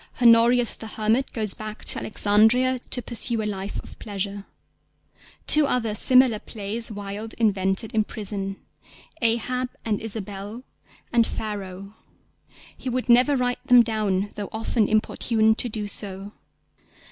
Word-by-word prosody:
Honorius 235 0 +5
the 220 - -9
hermit 220 +4 0
goes 215 -4 0
back 215 0 -8
to - - 0
Alexandria 220 +5 +3
to 245 - -2
pursue 235 -1 -1
a - - -3
life 200 -1 -4
of - - -14
pleasure. 200 -1 -5 1.0
Two 300 -1 +5
other 230 -5 0
similar 250 0 +5
plays 220 +2 -4
Wilde 205 +2 -7
invented 195 -1 0
in 220 -1 +2
prison, 200 -2 -2 0.7
Ahab 245 +2 0 0.2
and 215 -2 -1
Isabel 210 +1 -6 0.5
and 235 -1 +4
Pharaoh; 200 -2 -6 0.8
he 260 - -6
would 255 0 -3
never 255 +4 +5
write 245 -1 -1
them 245 -1 +7
down, 210 -3 -1
though 205 -2 -6
often 220 -1 0
importuned 220 +1 +1
to 245 - +2
do 215 -1 -4
so. 200 0 -3
220 Hz, 135 wpm, -24 LUFS, 205-235 Hz, 1.0 s, them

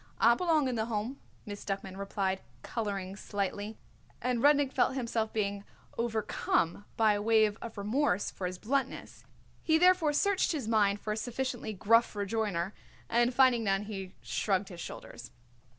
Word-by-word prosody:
"I 235 +1 +6
belong 315 0 +2
in 255 - -1
the 220 -2 0
Home," 230 +4 -3 0.3
Miss 205 -1 -7
Duckman 195 -1 -4
replied, 195 -1 -2 0.2
colouring 200 -4 -3
slightly, 205 +1 -3 0.4
and 250 -2 0
Rudnik 285 -1 +4
felt - - +2
himself 230 -4 -1
being 200 -2 -1 0.3
overcome 215 -5 0
by 220 -2 +5
a 205 - -1
wave 215 -1 +4
of 230 -2 -7
remorse 210 0 0
for 185 - -4
his 180 0 -5
bluntness. 265 +5 -3 0.4
He 320 -1 +3
therefore 355 -3 +4
searched 385 +4 +2
his 275 -8 -3
mind 205 -2 +3
for 215 - -2
a - - -4
sufficiently 245 -1 -3
gruff 230 +4 +3
rejoinder, 200 -3 -1 0.4
and 240 +1 +3
finding 250 -2 +4
none 195 -1 +1
he 195 -3 -7
shrugged 195 -1 0
his 175 -2 -8
shoulders. - - -8
220 Hz, 155 wpm, -31 LUFS, 200-245 Hz, 0.4 s, I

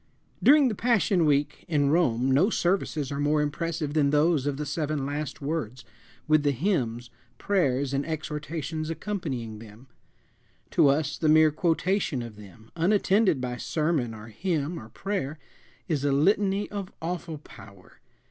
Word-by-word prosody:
During 290 0 +6
Passion 205 -6 +2
Week 145 0 +1
in 145 -4 +2
Rome 130 -6 +2
no 155 +10 +4
services 175 - 0
are 140 - -3
more 150 +1 +2
impressive 150 0 -2
than 150 -2 +3
those 150 -1 +2
of 140 -2 -1
the 150 - -3
seven 150 -1 -2
"last 145 0 -4
words," 140 -5 -3 0.4
with 155 0 +4
the 145 - +2
hymns, 125 - -1 0.3
prayers, 140 -9 0
and 140 +1 0
exhortations 155 0 -4
accompanying 150 - -4
them. 110 +2 -13 0.9
To - - +4
us 145 +1 +1
the 155 - +2
mere 155 0 +6
quotation 165 -3 0
of 115 -2 -9
them, 105 +2 -15
unattended 195 0 +3
by 125 -1 -3
sermon 150 -5 -1
or 110 +1 -10
hymn 165 - -2
or 110 - -11
prayer, 160 - -3 0.5
is 150 -5 -1
a 145 - +2
litany 195 +7 +2
of 200 -1 -5
awful 170 -1 -4
power. 100 -9 -15
150 Hz, 150 wpm, -27 LUFS, 135-170 Hz, 0.9 s, During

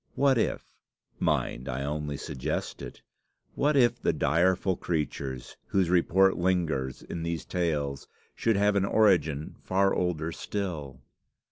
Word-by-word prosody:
What 135 -3 +3
if, - - -1 0.5
mind, 65 +3 -1
I 65 +2 -2
only 75 0 -3
suggest 65 - -4
it, - - -9 0.5
what 145 0 +2
if 120 -2 +3
the - - +2
direful 90 +3 +2
creatures, 70 -7 -4
whose 95 -3 +1
report 95 +2 +4
lingers 85 -8 0
in 85 - -6
these 85 0 -3
tales, 75 -6 -2 0.3
should 115 -2 +1
have 100 +1 +3
an 100 - +3
origin 85 -9 +2
far 95 +1 +1
older 85 -2 -1
still? 80 -11 -5
85 Hz, 130 wpm, -28 LUFS, 75-95 Hz, 0.5 s, report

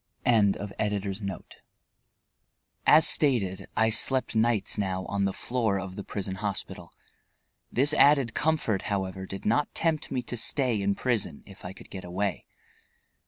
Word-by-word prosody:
EDITOR.] 100 -2 0 1.5
As 160 - +8
stated, 100 -10 +1
I 110 0 +3
slept 130 +2 +1
nights 110 -2 +1
now 95 -2 -2
on 100 -1 -1
the 100 - 0
floor 110 -2 -1
of 95 0 -7
the 100 - -6
prison 95 -1 -5
hospital. 100 -2 -4 0.8
This 140 +4 +3
added 140 -6 +4
comfort, 150 -11 0
however, 95 -1 -3
did 95 - -8
not 120 +7 +1
tempt 160 -2 0
me 125 - -2
to 120 - -6
stay 120 -1 +1
in 100 0 0
prison, 120 -4 -2
if 100 -2 -14
I 90 - -7
could - - -15
get 95 - -7
away. 95 +2 -3
105 Hz, 140 wpm, -27 LUFS, 95-120 Hz, 1.5 s, As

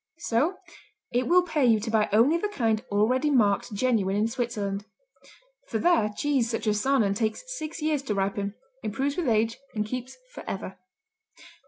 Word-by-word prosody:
So 320 +3 0 0.6
it 245 +1 0
will 360 +2 +5
pay 310 -5 0
you 230 -3 +5
to 220 - -3
buy 215 -1 +2
only 235 +10 +5
the 340 +5 0
kind 225 - 0
already 250 +8 +2
marked 220 -5 +2
genuine 205 -3 +1
in 210 +2 +2
Switzerland. 220 -5 -3 0.8
For - - -2
there 340 -12 +3
cheese 275 -5 +1
such 225 -1 -3
as 210 -1 +1
Saanen 260 -8 +3
takes 220 - -1 0.2
six 310 0 -6
years 305 -2 +1
to 210 - -1
ripen, 200 +1 -1 0.3
improves 265 +7 -2
with 350 -5 -1
age, 225 0 +1 0.2
and 210 -1 0
keeps 255 +3 -6 0.2
forever. 190 -1 -6
230 Hz, 165 wpm, -27 LUFS, 210-275 Hz, 0.8 s, will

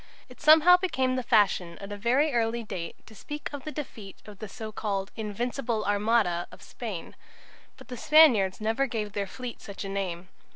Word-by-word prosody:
It 250 - -15
somehow 315 +4 +7
became 260 -9 0
the 255 - -1
fashion 200 -7 +2
at 200 +1 -9
a - - -4
very 255 +8 +1
early 230 0 0
date 185 -6 -7
to - - -15
speak 295 +7 -7
of 285 -2 -7
the 305 - -4
defeat 225 -10 -8
of 205 -2 -12
the 215 - -6
so 220 0 -7
called 200 -2 -3
"Invincible 230 +1 -3
Armada" 205 -4 +1
of - - -14
Spain. 215 -8 -7 0.6
But - - -14
the 250 - -6
Spaniards 235 -10 +5
never 225 +6 0
gave 215 -4 -4
their 200 -1 -2
fleet 245 +3 -8
such 200 0 -7
a - - -5
name. 185 -2 -4
220 Hz, 190 wpm, -27 LUFS, 200-255 Hz, 0.6 s, somehow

